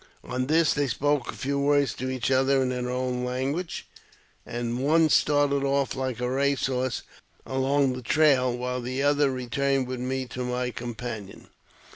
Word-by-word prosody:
On 130 0 -3
this 160 0 +3
they 145 -1 0
spoke 145 +1 0
a - - -12
few 140 +1 -2
words 145 0 +2
to 130 +1 -4
each 130 0 -1
other 135 +1 +3
in 130 - 0
their 125 -1 -2
own 125 0 -2
language, 135 +8 -3 0.6
and 120 0 -3
one 160 +2 +4
started 145 -2 +3
off 140 -1 +1
like 130 -2 -3
a 125 - -1
race 140 +2 +1
horse, 130 -2 -1 0.4
along 135 0 +1
the 125 - -6
trail, 135 -1 +3
while 125 0 -3
the 130 +3 -2
other 145 0 +3
re 130 -1 -4
turned 135 +1 +1
with 130 0 -5
me 130 +1 -2
to 125 +2 -4
my 125 0 -2
companion. 115 -3 -7
130 Hz, 175 wpm, -26 LUFS, 125-140 Hz, 0.6 s, one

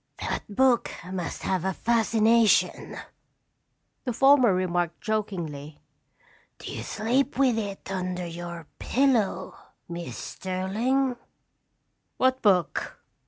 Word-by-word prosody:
"That - - -3
book 260 -1 +3 0.2
must 180 -2 -4
have 185 -3 0
a 190 0 0
fascination," 230 0 +2 1.1
the 250 - -2
former 270 -2 +6
remarked 175 -2 0
jokingly. 170 -9 -4 0.8
"Do - - -8
you - - -5
sleep 240 +5 0
with 255 -4 +3
it 200 -2 -6
under 180 -1 -3
your 170 -1 -7
pillow, 230 -8 +1 0.3
Miss 170 0 -6
Sterling?" 230 +8 -1 1.0
"What 260 0 +2
book?" 185 -6 +1
200 Hz, 100 wpm, -26 LUFS, 180-240 Hz, 1.1 s, former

